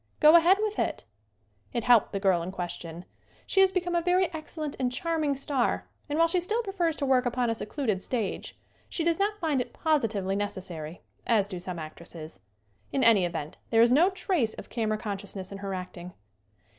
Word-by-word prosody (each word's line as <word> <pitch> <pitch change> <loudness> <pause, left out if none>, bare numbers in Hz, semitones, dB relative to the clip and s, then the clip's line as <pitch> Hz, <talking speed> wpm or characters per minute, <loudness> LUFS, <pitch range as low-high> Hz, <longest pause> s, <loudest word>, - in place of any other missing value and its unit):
Go 305 +2 +8
ahead 345 +3 +6
with 425 -1 -2
it." - - -1 0.7
It 235 - -1
helped 240 -3 +5
the 195 - -2
girl 190 -3 +3
in 175 +2 -4
question. 175 -2 -6 0.4
She 385 - +1
has 380 -1 +5
be 375 - +2
come 350 0 -3
a 345 - +2
very 360 0 +2
excellent 310 -1 -5
and 250 -2 0
charming 310 +1 0
star 270 -2 0 0.2
and 295 - -1
while 330 +1 +5
she 360 +2 +1
still 430 +7 -1
prefers 355 -6 -1
to 280 - -1
work 260 -2 +3
upon 245 -1 0
a - - +1
secluded 220 -3 -2
stage 225 -4 -3 0.3
she 335 - -2
does 335 +1 +1
not 415 +1 +1
find 305 -6 +1
it - - -6
positively 220 - 0
necessary, 180 -5 -5 0.2
as 220 -4 +3
do 190 -3 -6
some 180 0 -5
actresses. 155 - -9 0.5
In 270 - +1
any 220 -6 +6
event 160 -3 -5
there 225 0 +5
is 235 - +4
no 325 +8 +6
trace 360 - -1
of - - -10
camera 215 -2 0
consciousness 200 -2 -6
in 195 - -7
her 195 -1 -4
acting. 180 -1 -7
240 Hz, 195 wpm, -28 LUFS, -, 0.7 s, Go